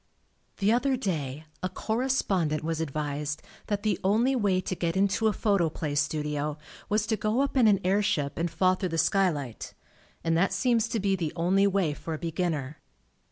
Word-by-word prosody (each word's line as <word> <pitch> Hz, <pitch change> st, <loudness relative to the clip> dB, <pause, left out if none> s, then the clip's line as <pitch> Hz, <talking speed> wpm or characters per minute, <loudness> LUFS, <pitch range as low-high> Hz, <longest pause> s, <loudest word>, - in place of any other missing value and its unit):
The 200 Hz, +1 st, +2 dB
other 260 Hz, +2 st, +2 dB
day 155 Hz, -, -3 dB, 0.2 s
a 185 Hz, -, -1 dB
correspondent 195 Hz, -, 0 dB
was 165 Hz, 0 st, -2 dB
ad 160 Hz, -, -2 dB
vised 145 Hz, 0 st, -3 dB, 0.2 s
that 205 Hz, -1 st, -2 dB
the 210 Hz, -4 st, +1 dB
only 225 Hz, +8 st, +3 dB
way 200 Hz, -6 st, +2 dB
to 185 Hz, -, -3 dB
get 170 Hz, -1 st, -1 dB
into 200 Hz, +3 st, +2 dB
a -, -, +4 dB
Photoplay 170 Hz, -7 st, 0 dB
studio 150 Hz, 0 st, -1 dB, 0.3 s
was 210 Hz, 0 st, +1 dB
to 225 Hz, 0 st, 0 dB
go 215 Hz, +4 st, 0 dB
up 280 Hz, 0 st, -1 dB
in 250 Hz, -4 st, +5 dB
an 200 Hz, -3 st, +4 dB
air 195 Hz, +3 st, +3 dB
ship 150 Hz, -9 st, -1 dB
and 170 Hz, +1 st, 0 dB
fall 185 Hz, +2 st, +3 dB
thru 185 Hz, 0 st, -2 dB
the 165 Hz, -, -2 dB
skylight, 160 Hz, -, 0 dB, 0.5 s
and 165 Hz, 0 st, +1 dB
that 185 Hz, +3 st, +2 dB
seems 235 Hz, +2 st, +2 dB
to 230 Hz, -1 st, -2 dB
be 195 Hz, -1 st, +1 dB
the 165 Hz, -5 st, -2 dB
only 185 Hz, +4 st, +3 dB
way 190 Hz, -6 st, +1 dB
for 160 Hz, +2 st, -5 dB
a -, -, -5 dB
beginner. 160 Hz, -4 st, -2 dB
185 Hz, 190 wpm, -28 LUFS, 155-210 Hz, 0.5 s, in